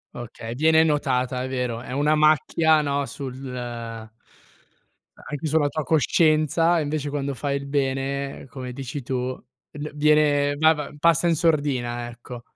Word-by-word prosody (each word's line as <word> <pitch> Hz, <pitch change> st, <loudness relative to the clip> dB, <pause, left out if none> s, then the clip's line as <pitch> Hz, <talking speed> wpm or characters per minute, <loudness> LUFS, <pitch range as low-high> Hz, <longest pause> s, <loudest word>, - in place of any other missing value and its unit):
Okay, 115 Hz, -1 st, -7 dB
viene 160 Hz, +4 st, +4 dB
notata, 130 Hz, -4 st, 0 dB
è -, -, -3 dB
vero, 125 Hz, -3 st, -2 dB
è 125 Hz, -, -9 dB
una 145 Hz, +3 st, +2 dB
macchia, 155 Hz, +1 st, +3 dB
no, 140 Hz, -1 st, -1 dB
sul 135 Hz, -3 st, -6 dB, 1.8 s
a -, -, -16 dB
anche 145 Hz, +1 st, -5 dB
sulla 150 Hz, -1 st, +2 dB
tua 155 Hz, +1 st, -3 dB
coscienza, 160 Hz, +2 st, +3 dB
e -, -, 0 dB
invece 145 Hz, 0 st, -3 dB
quando 140 Hz, -2 st, -3 dB
fai 140 Hz, +3 st, -2 dB
il 140 Hz, 0 st, -7 dB
bene, 140 Hz, 0 st, -2 dB
come 130 Hz, -2 st, -7 dB
dici 135 Hz, +1 st, -6 dB
tu, 130 Hz, 0 st, -2 dB, 0.4 s
n 150 Hz, +1 st, -5 dB
viene 145 Hz, -1 st, +3 dB
va 160 Hz, +1 st, +5 dB
va 150 Hz, -2 st, -6 dB
passa 170 Hz, +1 st, +3 dB
in 165 Hz, -, +3 dB
sordina, 135 Hz, -7 st, 0 dB
ecco. 120 Hz, 0 st, -10 dB
145 Hz, 155 wpm, -24 LUFS, 130-155 Hz, 1.8 s, va